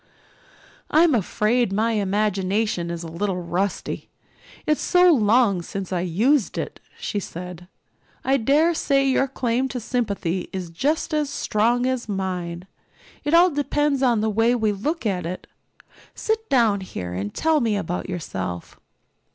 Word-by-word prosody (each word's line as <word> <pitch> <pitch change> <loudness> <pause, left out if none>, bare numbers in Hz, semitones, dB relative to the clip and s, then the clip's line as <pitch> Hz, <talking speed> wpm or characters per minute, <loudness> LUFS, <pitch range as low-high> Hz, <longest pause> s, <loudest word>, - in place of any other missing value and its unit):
"I'm 320 0 +5
afraid 225 +1 +1
my 220 +4 +1
imagination 200 -2 0
is 170 0 -4
a - - -6
little 180 +3 -2
rusty 180 +3 -3 0.6
it's 305 - +1
so 360 -1 +5
long 215 - +3
since 190 +2 -5
I 180 - 0
used 215 - +1
it," - - -4 0.2
she 205 - -3
said. 180 -1 -8 0.6
"I 270 +1 +3
dare 290 +8 +3
say 275 -3 +2
your 270 +1 +2
claim 255 0 0
to 255 -1 -4
sympathy 200 -7 -2
is 180 -3 -5
just 300 - -1
as 300 -2 +1
strong 240 0 +1
as 255 -3 -2
mine. 180 -3 -3 0.6
It 295 +3 +2
all 350 +1 +6
depends 290 -1 0
on 240 -5 +3
the 220 - +1
way 225 +3 +3
we 220 -3 +1
look 290 - -3
at 180 -5 -1
it. 180 +2 -6 0.7
Sit 445 0 -2
down 225 -6 +3
here 90 - -6
and 100 +3 -3
tell 320 -1 +2
me 225 -5 +1
about 180 -1 -3
yourself." 95 - -5
215 Hz, 150 wpm, -23 LUFS, 185-270 Hz, 0.7 s, all